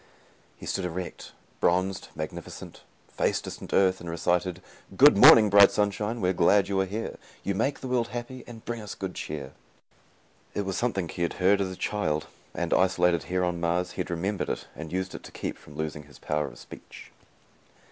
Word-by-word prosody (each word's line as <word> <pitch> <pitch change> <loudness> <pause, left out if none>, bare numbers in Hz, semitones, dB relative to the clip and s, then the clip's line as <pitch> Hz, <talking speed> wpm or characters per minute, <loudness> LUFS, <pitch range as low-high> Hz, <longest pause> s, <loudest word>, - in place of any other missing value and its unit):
He - - -10
stood 95 - -2
erect, 90 0 -5 0.3
bronzed, 95 +2 +1
magnificent, - - -7 0.3
faced - - -1
distant - - -8
Earth, 95 -1 +3
and 85 - -6
recited: 90 +2 0 0.4
"Good - - +8
morning, 110 -3 +9
bright 100 0 +9
sunshine, 105 +2 -1
We're 90 0 +2
glad 95 +3 +4
you 100 -1 0
are 95 - -1
here. 110 +4 -4 0.3
You 100 - -1
make 130 +8 -1
the 130 - -5
world 125 -2 +1
happy, 120 +1 -6
And 115 -2 -11
bring 120 -1 -4
us 105 - -7
good 95 -2 -5
cheer." 70 -3 -6 1.0
It 100 - -1
was 95 -1 -2
something 100 -7 -1
he 85 - -7
had 85 - 0
heard 100 +2 +3
as 95 - -1
a 95 - -6
child 80 -7 -1 0.3
and, - - -1
isolated 90 -2 +3
here 90 0 0
on 90 -1 -1
Mars, 85 +1 0
he - - -11
had - - -5
remembered 95 +4 -2
it - - -3
and 80 0 -8
used 95 +1 -2
it - - -7
to - - -12
keep - - -4
from 75 - -15
losing 75 -1 -4
his 75 - -16
power 75 -1 -1
of - - -11
speech. - - -12
95 Hz, 195 wpm, -27 LUFS, 85-105 Hz, 1.0 s, morning